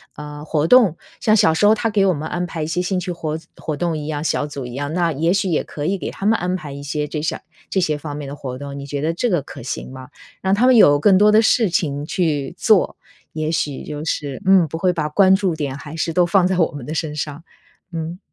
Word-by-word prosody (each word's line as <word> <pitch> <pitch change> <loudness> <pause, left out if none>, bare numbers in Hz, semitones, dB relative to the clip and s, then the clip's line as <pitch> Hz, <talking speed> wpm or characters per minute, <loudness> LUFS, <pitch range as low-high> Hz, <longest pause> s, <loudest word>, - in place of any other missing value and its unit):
呃， 150 0 -8
活 155 0 0
动， 200 -4 +5 0.2
像 215 0 +3
小 160 - +4
时 205 +6 +3
候 215 - +6
他 225 0 -1
给 200 -2 +3
我 185 - +3
们 150 +2 -5
安 180 - -2
排 160 -2 -4
一 - - -1
些 165 +3 -1
兴 180 0 -1
趣 180 0 -4
活 160 -2 -3 0.2
活 155 -2 -4
动 170 0 -1
一 150 0 -5
样， 150 -1 -3
小 150 -2 0
组 140 -3 -6
一 120 - -8
样， 145 +2 -3
那 170 -2 +1
也 160 +4 0
许 195 +1 +1
也 165 - +1
可 145 0 -6
以 195 +3 +1
给 - - -4
他 195 - -7
们 225 +2 +4
安 180 +1 -1
排 150 -6 -7
一 140 - -7
些 150 +1 -3
这 150 0 -4
下 155 - -2 0.3
这 190 - 0
些 155 -5 +1
方 145 -1 -6
面 145 -2 -6
的 140 - -6
活 130 -3 -6
动， 140 0 -7
你 140 - -8
觉 140 0 -3
得 160 +3 0
这 240 +8 0
个 175 -8 +1
可 140 - -10
行 125 - -5
吗？ 130 -1 -9 0.3
让 190 +1 +2
他 235 +5 +3
们 255 0 +6
有 145 -10 +7
更 190 +2 +5
多 210 0 +6
的 215 - +6
事 220 -2 +3
情 145 -4 -1
去 155 -7 -1
做， - - +3 0.4
也 155 0 -2
许 145 -4 -2
就 150 0 -6
是 145 -2 -3
嗯， 190 -4 +6
不 160 +2 -6
会 185 +1 +2
把 155 -4 -2
关 190 +4 +5
注 190 -4 0
点 140 -3 -3
还 150 +2 -9
是 165 +1 -1
都 175 +2 +3
放 180 +1 +3
在 185 -1 0
我 165 - +2
们 145 -4 -8
的 155 - -4
身 150 -1 -2
上， 150 +1 -5 0.5
嗯。 165 +1 -4
160 Hz, 290 characters per minute, -20 LUFS, 145-185 Hz, 0.5 s, 有